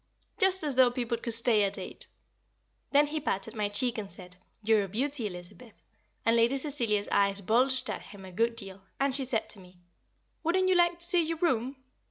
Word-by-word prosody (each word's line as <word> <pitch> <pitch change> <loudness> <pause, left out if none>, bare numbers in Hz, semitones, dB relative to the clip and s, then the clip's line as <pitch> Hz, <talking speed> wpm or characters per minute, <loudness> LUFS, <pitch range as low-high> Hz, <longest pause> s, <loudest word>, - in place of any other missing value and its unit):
Just 380 -2 +4
as 290 -4 -1
though 255 -1 +6
people 240 -1 -2
could 235 -1 +2
stay 230 -2 +5
at 195 - 0
eight! - - -8 0.8
Then 290 +1 +4
he 305 +1 -3
patted 195 -9 -3
my 210 -2 -1
cheek, 230 +3 +1
and 200 -2 -7
said, 180 -1 -11 0.3
"You're 215 -1 +2
a - - -9
beauty, 250 +4 -1
Elizabeth," 185 +5 -11 0.5
and 230 - +3
Lady 235 +4 +3
Cecilia's 240 -8 -1
eyes 200 0 +1
bulged 255 +5 +1
at - - -4
him 195 -2 -12
a 185 - -11
good 230 +5 0
deal, 195 -4 -7 0.2
and 275 -1 +1
she 275 - 0
said 230 -3 -1
to 210 - -4
me, 180 -1 -17 0.7
"Wouldn't 370 +3 +1
you - - +4
like 345 -1 +3
to 345 - +2
see 350 0 +4
your 325 +1 -3
room?" 265 -6 0
235 Hz, 205 wpm, -28 LUFS, 205-285 Hz, 0.8 s, though